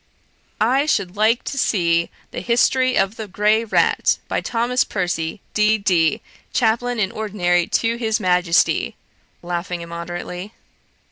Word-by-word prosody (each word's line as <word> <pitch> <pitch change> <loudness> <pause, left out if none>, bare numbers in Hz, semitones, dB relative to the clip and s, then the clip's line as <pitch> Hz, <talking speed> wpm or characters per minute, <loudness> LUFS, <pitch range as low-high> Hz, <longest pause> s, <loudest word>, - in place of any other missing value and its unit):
I 260 +7 +2
should 195 -9 0
like 220 +3 +2
to 275 - -4
see 170 -7 +1 0.2
The - - -5
History 255 +2 +2
of 195 +3 +1
the 220 - -6
Grey 210 +3 +2
Rat, 225 - +2
by - - -1
Thomas 245 +2 0
Percy, 175 -2 -3
D.D., 200 -7 +2 0.3
Chaplain 240 +1 +1
in 195 -3 0
Ordinary 175 -5 0
to 230 +1 0
His 220 -2 0
Majesty,' 180 -2 +2 0.5
(laughing 175 0 -4
immoderately). 175 +3 -6
205 Hz, 125 wpm, -20 LUFS, 175-230 Hz, 0.5 s, I